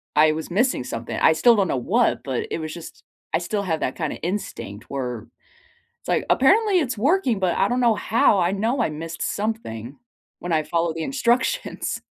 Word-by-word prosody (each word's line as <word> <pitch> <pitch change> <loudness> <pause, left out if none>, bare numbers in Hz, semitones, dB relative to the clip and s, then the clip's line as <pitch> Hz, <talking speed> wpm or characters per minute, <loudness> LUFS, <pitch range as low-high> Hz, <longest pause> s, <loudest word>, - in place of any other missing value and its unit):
I 155 +1 +6
was 160 +2 -4
missing 215 - +1
something. 115 -1 -5
I 160 - +5
still 230 +9 +5
don't 195 -3 +2
know - - -1
what, 225 - +1
but 130 -3 -3
it - - -2
was 155 -1 -5
just 170 -2 -10 0.3
I 160 - +3
still 200 +4 -2
have 165 -5 -2
that 130 - -1
kinda 155 -4 -2
instinct 165 - -5
where 125 -5 -4 0.7
it's - - -18
like, - - +1
"Apparently 395 - +4
it's 260 -6 -2
working, 270 - +2
but 185 -2 +1
I - - +3
don't 250 +1 0
know 230 -3 +4
how. 215 -2 +3
I 175 +1 +2
know 230 +6 0
I 215 - +1
missed 160 +1 -7
something 145 - -4 0.4
when 175 -1 -3
I 155 - +2
followed 165 0 -1
the 160 - -3
instructions." 265 - -1
180 Hz, 195 wpm, -23 LUFS, 155-235 Hz, 0.7 s, I